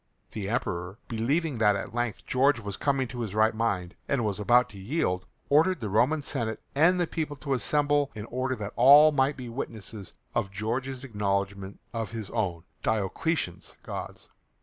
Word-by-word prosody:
The 100 -3 -4
Emperor, 95 -5 -2
believing 135 +5 0
that 105 -2 +4
at 100 - -5
length 120 -2 -2
George 135 0 +3
was 100 -3 -5
coming 135 0 0
to 120 - -7
his 110 -4 -4
right 110 +1 +4
mind, 100 -6 -1 0.2
and 130 -5 +1
was 105 -1 -1
about 120 +4 +4
to 100 - -11
yield, 95 - -1 0.2
ordered 160 +5 +4
the 110 - -3
Roman 140 +8 +2
Senate 115 -6 -2
and 175 +4 +3
people 155 -2 -2
to 140 0 -3
assemble 145 +2 +2
in 105 -1 -6
order 130 +2 -2
that 105 -3 -6
all 145 +6 +8
might 140 0 +1
be 125 -2 -6
witnesses 110 -5 -6 0.2
of 100 - 0
George's 125 +7 -3
acknowledgement 100 -4 -2
of 115 -2 -3
his 110 -4 -5
own, 90 -8 -1 0.2
Diocletian's, 110 - -1
gods. - - -7
115 Hz, 170 wpm, -28 LUFS, 105-140 Hz, 0.2 s, all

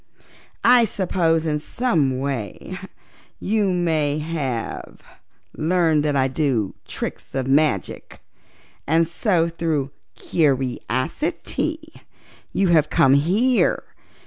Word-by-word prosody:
I 240 0 +6
suppose 170 -5 0
in 150 -1 0
some 150 - 0
way 130 -8 -4 0.6
you 210 0 +1 0.6
have 140 -8 -4 0.6
learned 160 -2 +2
that 150 -1 0
I 135 -1 +3
do 130 -7 0
tricks - - -6
of 135 -1 -1
magic, 135 -7 0 0.7
and 165 +2 +3
so 170 0 +1
through 160 -5 -2 0.2
curiosity 160 - -2 0.5
you 195 -2 +1
have 155 -3 +4
come 135 - +4
here. 200 - +2
155 Hz, 95 wpm, -22 LUFS, 135-180 Hz, 0.7 s, I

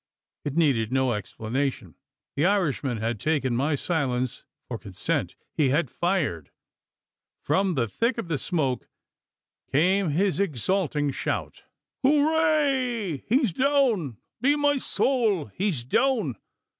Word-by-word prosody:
It 145 -1 -4
needed 130 -9 +2
no 130 -2 +2
explanation. 115 - -3 0.4
The 145 - +1
Irishman 150 - 0
had 110 0 -2
taken 140 -4 0
my 145 +5 +1
silence 130 -6 -1 0.2
for - - -5
consent: - - -2 0.2
he 145 -4 +2
had 145 -1 +1
fired! 165 - -1 0.9
From 185 +4 +1
the 120 -4 +1
thick 230 - 0
of 230 - -4
the 155 -4 -1
smoke 135 -7 -1 0.8
came 180 +6 +3
his 185 +6 +1
exulting 155 - 0
shout: - - -4 0.4
"Hooray! 280 - +2
he's 240 - +2
down 250 - +2 0.2
be 280 +3 +4
my 290 -1 +2
sowl! 225 - +1
he's 185 - -1
down! 200 - +1
160 Hz, 120 wpm, -26 LUFS, -, 0.9 s, be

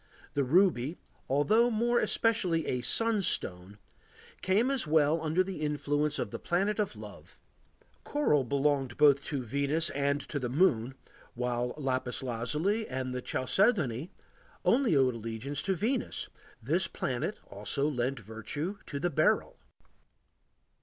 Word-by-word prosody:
The 140 - +1
ruby, 160 -1 +2 0.3
although 210 - +3
more 240 +1 +2
especially 185 -8 +1
a 125 - -1
sunstone, 120 - +1 0.6
came 215 +8 +2
as 265 - 0
well 155 +1 +3
under 160 +4 +1
the 185 -4 -6
influence 150 0 0
of - - -3
the - - -5
Planet 195 +5 0
of 210 - -1
Love. - - -12 0.7
Coral 220 - +1
belonged 135 -1 0
both 145 -2 +5
to 140 -4 -3
Venus 140 +7 0
and 140 +1 0
to 145 +1 -4
the 125 -2 -3
moon, 130 -4 +2 0.4
while 125 0 -2
lapis 130 -2 -2
lazuli 150 - -1
and 130 0 -4
chalcedony 155 - +1 0.5
only 245 - +3
owed 130 -2 +3
allegiance 115 +5 -4
to 195 -1 0
Venus; 235 +8 -2 0.3
this 170 +8 +2
planet 125 -6 -3
also 105 +8 -1
lent 130 -2 -1
virtue 125 - -5
to 140 - -4
the 175 +4 -1
beryl. - - +1
145 Hz, 130 wpm, -30 LUFS, 130-185 Hz, 0.7 s, both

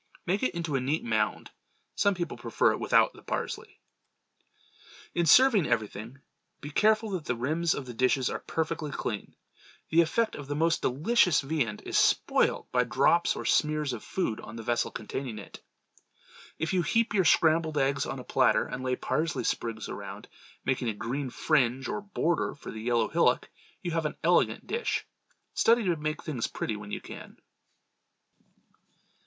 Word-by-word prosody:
Make 195 +4 0
it 255 - 0
into 170 -4 -2
a - - +2
neat 145 +5 -1
mound. 110 -2 -1 0.4
Some 200 -1 +2
people 175 -1 -3
prefer - - +1
it - - -3
without - - +3
the - - -15
parsley. - - -5 1.3
In 170 -1 +1
serving 230 - +6
everything, 115 +1 -2 0.4
be 145 - -8
careful 215 +5 +3
that 180 -5 -3
the 125 - -1
rims 155 +8 0
of 140 - -5
the 125 - -7
dishes 130 +2 +2
are - - -2
perfectly 160 -1 -3
clean. 110 -6 -4 0.6
The 165 +1 +6
effect 220 +8 +1
of 145 - -8
the 145 - -3
most 165 +2 +2
delicious 175 - +3
viand 135 -7 -2
is - - +1
spoiled - - +2
by 125 0 +3
drops 135 +8 +2
or - - -6
smears 150 -3 +1
of 115 - -6
food 145 -13 -2
on 105 - -9
the 115 - -7
vessel 120 +1 0
containing 130 -5 -5
it. 105 - -10 1.0
If 160 +3 -2
you 185 - +3
heap 225 +7 +1
your 195 -2 +3
scrambled 160 -1 +3
eggs 135 -1 +1
on 135 - -4
a 125 - -7
platter 130 0 +3
and 125 - -6
lay 130 0 0
parsley 160 +5 -1
sprigs 115 -2 -2
around, - - -7 0.4
making 130 -2 0
a 110 - -3
green 130 +5 -3
fringe 130 0 +1
or 210 0 -3
border 175 -4 -1
for - - -9
the 110 - -7
yellow 115 -1 +1
hillock, - - +2 0.3
you 175 - -2
have 165 -1 0
an - - -8
elegant - - +2
dish. 465 +1 -2 0.5
Study 230 +1 +4
to 180 -4 +1
make 155 0 -3
plain - - -22
things 130 -7 -2
pretty 110 - -3
when 105 -1 -8
you - - -4
can. - - -11
145 Hz, 175 wpm, -28 LUFS, 125-170 Hz, 1.3 s, serving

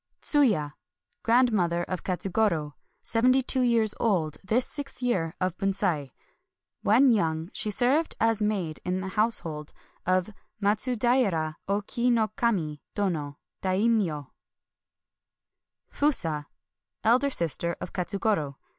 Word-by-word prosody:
TsUYA. 210 - +2 0.2
— - - -42
Grandmother 215 -8 +2
of 185 0 -4
Katsugoro. 180 -5 0 0.3
Sev 225 0 0
enty 255 +1 +4
two 260 - +1
years 230 -3 +4
old 175 -9 0
this 225 +6 +1
sixth 280 -3 -6
year 180 -10 0
of 185 -2 -1
Bunsei. 195 -8 0 0.7
When 250 +5 +5
young 165 -5 0
she 215 - +1
served 260 +10 +1
as 225 -1 +2
maid 195 -7 -1
in 180 +1 -2
the 190 - -4
house 220 +4 +2
hold 150 -3 -7 0.3
of 185 +3 +1 0.3
Matsudaira 215 -6 +1
Oki 210 +5 0
no 225 -3 +2
Kami 180 -11 -1
Dono 155 -8 -2 0.2
[Dai 190 +4 +1
myo\, 165 - -1 1.6
FuSA. 165 - 0 0.3
— - - -59
Elder 250 +5 +4
sister 170 - -1
of - - -7
Katsugoro. 185 -6 -1
200 Hz, 125 wpm, -27 LUFS, 170-235 Hz, 1.6 s, When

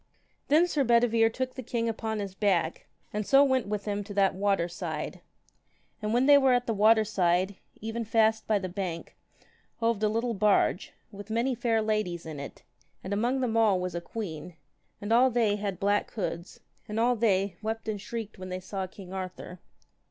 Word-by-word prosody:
Then 310 +4 +5
Sir 300 -5 +1
Bedivere 235 -2 +4
took 255 +2 -3
the 260 - -6
king 235 -1 -2
upon 220 -1 -2
his 200 -2 -4
back, 190 -5 0 0.3
and 210 +1 -1
so 275 +6 +6
went 260 -5 +1
with 205 -1 -3
him 205 -1 -2
to 205 -1 -8
that 195 -1 +3
water 195 -2 +1
side. 170 -4 -5 0.8
And 210 0 -2
when 245 +3 +3
they 285 0 +8
were 265 -2 +4
at 245 0 +1
the 225 - -1
water 220 +1 +5
side, 185 -1 +1 0.2
even 225 +2 -3
fast 220 0 +2
by 215 - +3
the 190 -2 -3
bank 180 -3 -5 0.6
hoved 230 -2 +1
a 215 - +3
little 230 +2 -1
barge, 205 -2 +2 0.2
with 205 0 -10
many 235 +4 0
fair 230 -2 0
ladies 215 -6 -1
in 155 -3 -7
it, 140 - -9 0.4
and 190 - -3
among 240 +6 0
them 235 -3 -1
all 215 -5 +4
was 180 -1 -3
a 170 - -3
queen, 170 -5 -6 0.4
and 205 +2 -1
all 250 +3 +6
they 225 -4 +1
had 200 -3 -4
black 205 +1 +1
hoods, 180 -5 -5 0.3
and 210 +1 -3
all 245 +2 +3
they 200 -5 +1
wept 220 +1 -4
and 210 -2 -3
shrieked 220 -2 -6
when 185 0 -7
they 185 0 -4
saw 190 +1 -5
king 185 0 -11
Arthur. 185 -1 -6
210 Hz, 195 wpm, -28 LUFS, 190-230 Hz, 0.8 s, they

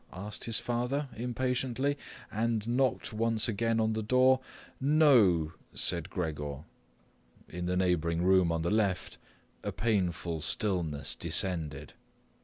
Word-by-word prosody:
asked 100 +3 -7
his 115 -2 0
father 125 +4 -1
impatiently 125 +3 -1 0.4
and 110 0 -1
knocked 125 -1 0
once 115 +1 +1
again 115 +1 0
on 110 0 +1
the 110 - -2
door. 130 +4 +4 0.4
"No," 125 - +4 0.2
said - - +1
Gregor. 75 -4 -4 0.8
In 90 +1 -5
the 90 0 0
neighbouring 85 -2 +1
room 95 -2 +4
on 80 -1 -1
the 85 - 0
left 100 -4 0 0.4
a - - -3
painful 90 -7 -1
stillness 80 -8 -1
descended. 80 -7 -2
105 Hz, 120 wpm, -30 LUFS, 85-120 Hz, 0.8 s, door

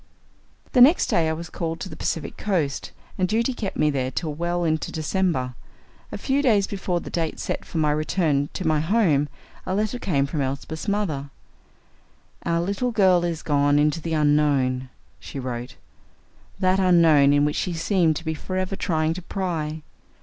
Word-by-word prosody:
The 250 - +4
next 295 +8 +6
day 160 -2 +2
I - - 0
was 165 +1 -7
called 165 -1 -3
to - - -4
the - - -9
Pacific 165 - -3
coast, 165 -9 -2 0.3
and 185 - +2
duty 230 +6 +1
kept 210 -5 -4
me 150 0 +3
there 130 -2 -1
till 155 +3 -3
well 175 +3 -1
into 160 -2 -1
December. 155 -5 -1 0.6
A - - -4
few 275 +1 0
days 215 -8 +3
before 185 -3 -2
the - - -9
date 165 -2 -2
set - - -3
for - - -7
my 155 -2 +2
return 150 -2 0
to 185 - -4
my 155 -1 +3
home, 160 -5 +2 0.3
a 185 - -2
letter 215 +4 -1
came 140 - +1
from 145 +1 -3
Elsbeth's 140 +6 -4
mother. 170 -9 -1 1.2
"Our 170 0 +1
little 200 +8 -1
girl 190 -6 +4
is 170 -2 -2
gone 145 -1 +2
into 150 +2 +2
the 165 +1 -3
Unknown," 145 -4 +2 0.3
she - - -9
wrote 125 -2 -5 0.8
"that 190 0 +2
Unknown 165 -6 +5
in 145 0 +4
which 150 - -1
she 180 - -1
seemed 165 -1 +2
to 165 - -6
be 160 - -1
forever 185 +4 -3
trying 160 -3 0
to 185 - -6
pry. 160 -5 -3
165 Hz, 180 wpm, -24 LUFS, 150-185 Hz, 1.2 s, next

